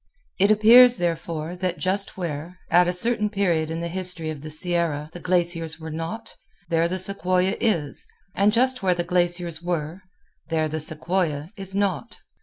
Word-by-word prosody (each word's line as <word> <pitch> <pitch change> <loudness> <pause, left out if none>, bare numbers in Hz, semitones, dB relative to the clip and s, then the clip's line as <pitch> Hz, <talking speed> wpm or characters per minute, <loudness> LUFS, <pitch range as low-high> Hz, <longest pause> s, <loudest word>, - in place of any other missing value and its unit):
It 200 +2 +4
appears, 235 +3 +7
therefore, 165 -1 -3
that 180 -1 -2
just 195 +2 -2
where, 170 0 -5
at 175 0 +5
a - - +2
certain 210 +3 +2
period 175 -6 0
in 165 +1 -4
the 170 - -3
history 180 -2 -3
of 150 -3 -8
the 155 - -8
Sierra, 155 -2 -1
the 175 - -8
glaciers 170 -2 0
were 160 0 -7
not, 165 +8 -6 0.3
there 165 0 +2
the 185 +2 -3
sequoia 185 0 +1
is, 155 -11 -1 0.3
and 200 +2 +3
just 255 +2 +1
where 185 -2 +2
the 175 - -1
glaciers 175 -2 0
were, 170 0 -3 0.5
there 160 -1 0
the 155 +1 -4
sequoia 155 0 -2
is 195 -2 +1
not. 200 +2 -2
175 Hz, 170 wpm, -24 LUFS, 160-190 Hz, 0.5 s, appears